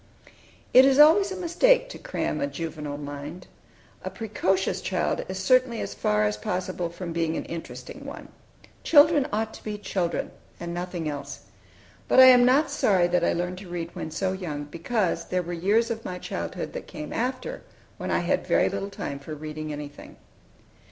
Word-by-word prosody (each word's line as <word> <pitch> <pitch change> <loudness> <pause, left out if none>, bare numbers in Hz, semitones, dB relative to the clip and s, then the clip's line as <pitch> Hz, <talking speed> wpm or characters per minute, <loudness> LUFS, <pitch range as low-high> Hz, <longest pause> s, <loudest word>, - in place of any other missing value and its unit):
It 255 - +9
is 270 0 +4
always 330 +7 +7
a - - -3
mistake - - +3
to - - -9
cram - - -3
a 285 - +1
juvenile 155 - -5
mind. 145 +4 -7 0.6
A - - -3
precocious 195 -4 -1
child 180 -2 -1
is 190 - -4
certainly 255 +4 +3
as 100 - -4
far 105 +1 +1
as 105 0 0
possible 180 - -3
from 170 0 -6
being 165 -1 0
an - - -4
interesting 165 0 -8
one. - - -9 0.5
Children 295 -2 +6
ought 220 +1 -1
to - - -12
be 210 -1 -4
children, 185 -4 -2 0.3
and 170 0 -5
nothing 175 -2 -4
else. 145 -1 -6 0.7
But - - +4
I 260 - +11
am 250 -1 +8
not 280 +3 +3
sorry 190 -10 +3
that 180 0 +2
I - - +2
learned 180 +1 -3
to 190 -2 -11
read 170 -1 -4
when - - -5
so 185 +4 -1
young, 170 -6 -4
because 170 +6 -1
there 180 0 -1
were 175 +1 -5
years 210 +7 +2
of 225 0 -4
my 180 - -5
childhood 85 - -5
that - - -7
came 150 - -7
after, 255 - -3 0.4
when - - -4
I - - +1
had - - 0
very - - +3
little 200 - -4
time 140 -7 -5
for 155 +2 -7
reading 155 0 -6
anything. 145 -1 -8
180 Hz, 185 wpm, -26 LUFS, 160-245 Hz, 0.7 s, I